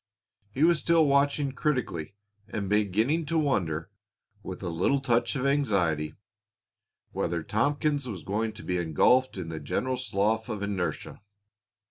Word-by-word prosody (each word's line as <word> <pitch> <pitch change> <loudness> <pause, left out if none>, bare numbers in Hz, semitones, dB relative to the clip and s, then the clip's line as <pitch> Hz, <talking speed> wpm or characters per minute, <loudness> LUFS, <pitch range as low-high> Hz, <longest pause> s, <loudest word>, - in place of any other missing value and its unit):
He 130 +8 -1
was 170 -1 +5
still 165 -2 +4
watching 140 0 +2
critically 125 - -2 0.3
and 100 -2 -4
beginning 110 - +1
to 165 +2 0
wonder, 95 - 0 0.5
with 95 0 -7
a 90 - -2
little 90 +12 +1
touch 120 0 +1
of 135 -1 -1
anxiety, 95 - +1 1.0
whether 85 -1 -2
Tompkins 145 - 0
was 95 -7 -6
going 110 +3 -1
to - - -10
be 90 - -1
engulfed 95 - +3
in 85 -3 -5
the 80 -1 -5
general 130 - -2
slough 110 -1 0
of 105 -3 -3
inertia. 100 -2 -3
110 Hz, 140 wpm, -28 LUFS, 90-140 Hz, 1.0 s, was